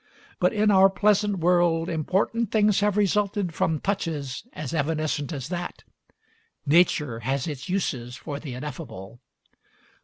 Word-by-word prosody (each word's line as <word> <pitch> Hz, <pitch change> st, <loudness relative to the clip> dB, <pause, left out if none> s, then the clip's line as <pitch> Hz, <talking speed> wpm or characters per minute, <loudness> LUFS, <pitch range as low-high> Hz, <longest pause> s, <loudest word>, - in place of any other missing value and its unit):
But -, -, +3 dB
in 215 Hz, -1 st, +2 dB
our 195 Hz, 0 st, +7 dB
pleasant 205 Hz, 0 st, +2 dB
world 175 Hz, -1 st, +2 dB
important 190 Hz, +7 st, 0 dB
things 210 Hz, -2 st, +3 dB
have 210 Hz, 0 st, +1 dB
resulted 200 Hz, -3 st, +1 dB
from 160 Hz, 0 st, 0 dB
touches 160 Hz, -, -3 dB
as 150 Hz, 0 st, -6 dB
evanescent 155 Hz, -1 st, -1 dB
as 140 Hz, -3 st, -5 dB
that. 175 Hz, -1 st, -5 dB, 0.8 s
Nature 150 Hz, -6 st, +3 dB
has 135 Hz, +3 st, -1 dB
its 145 Hz, -3 st, -6 dB
uses 125 Hz, -10 st, -2 dB
for 140 Hz, +1 st, -6 dB
the 140 Hz, -5 st, -7 dB
ineffable. 120 Hz, -6 st, -8 dB
165 Hz, 130 wpm, -25 LUFS, 140-195 Hz, 0.8 s, our